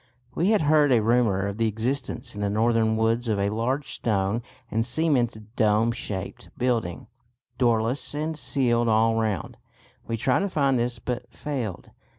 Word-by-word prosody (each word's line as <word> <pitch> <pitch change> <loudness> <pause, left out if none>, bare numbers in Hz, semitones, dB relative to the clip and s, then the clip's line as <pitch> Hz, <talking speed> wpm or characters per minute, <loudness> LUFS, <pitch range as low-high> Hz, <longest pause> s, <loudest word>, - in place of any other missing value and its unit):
We 175 +8 +1
had 215 -4 +3
heard 150 -1 +4
a 120 - +5
rumour 110 -4 +2
of 100 +2 -4
the 115 - +2
existence 120 +5 -3
in 105 - -6
the 100 - 0
northern 110 +1 +2
woods 115 +2 +1
of 110 -2 +1
a 100 +1 +1
large 125 +6 -1
stone 100 0 0 0.3
and 115 +1 +1
cemented 120 -5 0
dome 110 +1 +3
shaped 105 0 -6
building, 115 -9 -1 0.5
doorless 120 +3 +1
and 155 +2 -2
sealed 125 -3 +1
all 110 0 +3
round. 105 -6 -2 0.5
We 115 - -2
tried 130 +2 +2
to 200 - -1
find 140 -6 +2
this 120 0 -1
but 120 +2 -5
failed. 125 -11 -5
115 Hz, 165 wpm, -25 LUFS, 110-130 Hz, 0.5 s, a